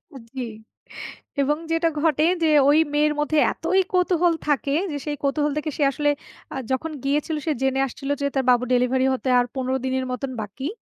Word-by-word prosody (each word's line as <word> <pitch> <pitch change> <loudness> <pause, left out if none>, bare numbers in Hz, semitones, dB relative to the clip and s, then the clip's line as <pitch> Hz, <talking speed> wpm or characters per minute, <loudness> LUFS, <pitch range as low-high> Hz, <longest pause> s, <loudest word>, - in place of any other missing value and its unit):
আ - - -7 0.2
জি। 260 - -3 1.0
এবং 295 +2 +1
যেটা 330 +1 +2
ঘটে 310 -2 +2 0.2
যে, - - +4 0.2
ওই 295 - +5 0.2
মেয়ের 300 +1 +3
মধ্যে 300 +1 0
এতই 375 +4 +1
কৌতূহল 360 -1 +3
থাকে 280 -1 +1 0.2
যে, 290 - -3
সেই 295 -1 -2
কৌতূহল 290 +1 +1
থেকে 305 +1 -2
সে 295 - +1
আসলে 295 +1 0 0.4
আ - - -6 0.2
যখন 285 +5 -1
গিয়েছিল, 295 +3 0
সে 320 - +1
জেনে 265 0 +1
আসছিল 275 +2 -8
যে - - 0
তার 270 - +2
বাবুর 250 0 +3
ডেলিভারি 250 +1 +2
হতে 260 0 -2
আর 245 - +2
১৫ 260 0 -1
দিনের 260 0 -1
মতন 260 +1 -3
বাকি। 215 +7 -6
285 Hz, 190 wpm, -23 LUFS, 260-305 Hz, 1.0 s, ওই